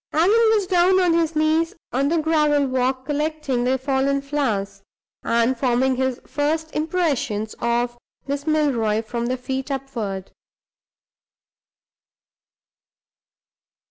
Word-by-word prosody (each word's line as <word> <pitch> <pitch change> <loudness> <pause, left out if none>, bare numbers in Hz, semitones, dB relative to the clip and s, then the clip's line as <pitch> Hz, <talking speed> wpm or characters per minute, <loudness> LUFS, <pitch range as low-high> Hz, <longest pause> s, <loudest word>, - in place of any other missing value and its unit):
Allan 335 +6 +4 0.2
was 410 -3 +1
down 370 0 +3
on 355 -2 +3
his 330 -1 +1
knees 315 +2 +1 0.2
on 270 +3 +1
the 335 - +1
gravel 300 -2 +2
walk, 260 0 -1
collecting 295 -4 -1
the 260 +1 +2
fallen 270 +1 0
flowers, 215 -9 -2 0.4
and 235 +2 +1
forming 255 +1 +1
his 260 -1 -1
first 315 +2 -2
impressions 295 - -1
of 240 +1 -1 0.3
Miss 285 +2 -4
Milroy 240 -9 +1
from 235 +1 -3
the 255 +1 -1
feet 265 +2 -4
upward. 235 -9 -4
275 Hz, 110 wpm, -22 LUFS, 245-310 Hz, 0.4 s, Allan